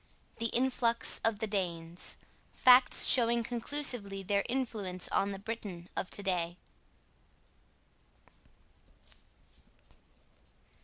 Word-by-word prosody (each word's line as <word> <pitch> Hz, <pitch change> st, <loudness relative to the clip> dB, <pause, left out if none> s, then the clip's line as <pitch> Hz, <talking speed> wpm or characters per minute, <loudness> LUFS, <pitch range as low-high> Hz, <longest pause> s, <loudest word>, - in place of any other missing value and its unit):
THE 230 Hz, -, 0 dB
INFLUX 235 Hz, -1 st, +2 dB
OF 225 Hz, -2 st, +1 dB
THE 220 Hz, -, -1 dB
DANES: 175 Hz, -4 st, -3 dB, 0.4 s
FACTS 250 Hz, 0 st, +5 dB
SHOWING 235 Hz, -1 st, +4 dB
CONCLUSIVELY 235 Hz, -5 st, -2 dB
THEIR 200 Hz, +1 st, 0 dB
INFLUENCE 215 Hz, -8 st, -3 dB
ON 200 Hz, -, 0 dB
THE 195 Hz, -, -5 dB
BRITON 200 Hz, -4 st, -7 dB
OF 185 Hz, -, -3 dB
TO 200 Hz, -, -3 dB
DAY. 175 Hz, -2 st, -1 dB
210 Hz, 90 wpm, -31 LUFS, 190-235 Hz, 0.4 s, FACTS